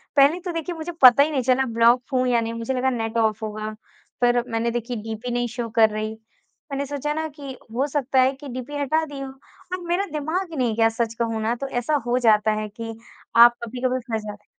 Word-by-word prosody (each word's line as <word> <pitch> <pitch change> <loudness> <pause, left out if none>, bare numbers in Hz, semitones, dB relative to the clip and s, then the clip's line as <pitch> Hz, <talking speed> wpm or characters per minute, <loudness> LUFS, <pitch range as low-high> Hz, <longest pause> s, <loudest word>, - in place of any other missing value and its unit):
पहले 285 +5 +5
तो 355 - -2
देखिए 330 +1 -4
मुझे 325 +2 -5
पता 255 +2 +9
ही 310 - -1
नहीं 270 -3 0
चला 260 +1 +2
ब्लॉक 235 +2 +4
हूँ 255 0 +2
या 240 -2 +3
नहीं, 230 0 -3
मुझे 230 +3 -3
लगा 260 +1 +1
नेट 225 -2 -2
ऑफ 220 -1 +1
होगा 215 0 -5 0.5
पर 240 0 +3
मैंने 230 +1 0
देखिए 240 0 -3
डीपी 225 +2 -5
नहीं 245 0 0
शो 235 0 -5
कर 220 -1 +6
रही। 215 +1 -4 0.5
मैंने 280 +1 -2
सोचा 290 +1 -3
ना 315 +1 -2
कि 280 -3 -9 0.2
हो 275 +3 +1
सकता 270 -2 0
है 260 +1 +4
कि 275 +1 -11
डीपी 255 +4 -6
हटा 310 +3 +1
दी 285 -2 -8
हो। 270 -1 -5
और 355 +6 -10
मेरा 360 +4 +1
दिमाग 315 +5 -2
ही 310 - -6
नहीं 235 -4 +1
गया 225 0 +4
सच 225 0 -2
कहूँ 225 -1 -1
ना 230 +2 0
तो 275 +3 -5
ऐसा 245 +4 -1
हो 245 +1 +1
जाता 215 -2 +4
है 215 - -4
कि 225 +1 -7 0.4
आप 235 +1 +8
कभी-कभी 255 +2 -2
फँस 220 -1 0
जाते 210 0 -9
245 Hz, 230 wpm, -23 LUFS, 225-280 Hz, 0.5 s, पता